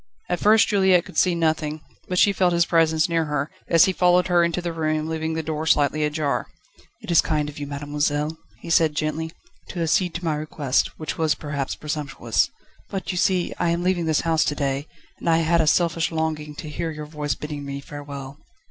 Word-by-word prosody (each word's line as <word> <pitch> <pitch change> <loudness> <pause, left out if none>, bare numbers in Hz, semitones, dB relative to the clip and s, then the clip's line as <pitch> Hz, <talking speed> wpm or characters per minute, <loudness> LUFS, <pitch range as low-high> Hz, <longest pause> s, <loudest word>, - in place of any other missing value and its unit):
At 175 - 0
first 215 +1 +5
Juliette 190 -4 +3
could - - -10
see 180 -2 +3
nothing, 155 -2 0 0.3
but 180 - -2
she 200 +2 +5
felt 180 -2 +2
his 170 0 +3
presence 160 -2 +3
near 165 -2 +1
her, 150 0 -2 0.2
as 165 -1 +6
he 190 - 0
followed 180 0 +3
her 175 -1 +4
into 170 +1 0
the 175 -1 -3
room, 155 -1 -1
leaving 160 0 -2
the 160 - -2
door 155 0 -3
slightly 150 0 +3
ajar. 150 -1 -1 0.5
"It - - -5
is 170 - +6
kind 150 -2 -1
of 145 0 -8
you, 145 - -4
mademoiselle," 145 +2 -1 0.3
he 170 - -6
said 160 -3 +4
gently, 155 +1 -2 0.4
"to 175 -2 -3
accede 170 +2 +1
to 175 0 -4
my 160 - +1
request, 150 -3 0
which 155 - -5
was 160 -2 +2
perhaps 140 -3 -4
presumptuous. 145 -6 -1 0.4
But, 195 -1 -3
you 180 - -4
see, 185 -2 +1
I 175 - +2
am 170 +1 0
leaving 180 -2 +1
this 155 -1 +2
house 160 -2 +2
to 145 - -1
day, 140 +1 -2 0.3
and - - -2
I 165 - +5
had 165 +1 +3
a 155 - 0
selfish 165 +1 +2
longing 155 -2 -2
to 155 - -7
hear 165 +2 -3
your 155 -1 -6
voice 150 -1 -3
bidding 150 -1 -6
me 140 0 -5
farewell." 140 -1 -8
160 Hz, 210 wpm, -23 LUFS, 150-170 Hz, 0.5 s, as